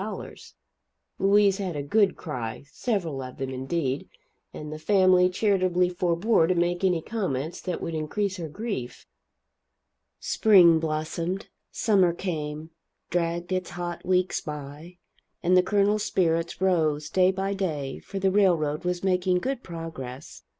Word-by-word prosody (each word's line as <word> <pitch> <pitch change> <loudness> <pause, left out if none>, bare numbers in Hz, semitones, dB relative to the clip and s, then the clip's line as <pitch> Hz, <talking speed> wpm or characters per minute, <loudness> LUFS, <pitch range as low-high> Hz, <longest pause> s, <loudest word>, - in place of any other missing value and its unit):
Louise 200 0 +4
had 185 -5 -3
a 145 - -3
good 200 +5 +2
cry 125 -9 -5
several 175 - -2
of 130 -1 -8
them, 135 -1 -4
indeed 135 +1 -2 0.4
and 150 0 -7
the 155 - -7
family 185 0 +4
charitably 185 -2 +2
forebore 175 +1 +2
to 185 - +1
make 175 +1 0
any 180 -4 +2
comments 165 - -3
that 180 -2 -4
would 165 - -3
increase 185 +6 -2
her 165 -3 -5
grief. 185 - -5 1.1
Spring 180 -7 +5
blossomed, 165 +4 -3 0.2
summer 190 -6 +2
came, 155 -3 -4 0.4
dragged 170 +1 -1
its 185 -1 -1
hot 175 +1 -5
weeks 185 0 +1
by, 150 +3 -8 0.5
and 180 +1 +4
the 185 - +7
Colonel's 205 +2 +2
spirits 165 -2 0
rose, 155 -6 +1
day 185 +2 +3
by 195 +1 -1
day, 155 -9 -3
for 195 - -8
the 190 0 +2
railroad 170 -7 +2
was 180 0 -2
making 180 -1 +2
good 260 +7 -2
progress. 160 - -8
175 Hz, 135 wpm, -26 LUFS, 155-190 Hz, 1.1 s, the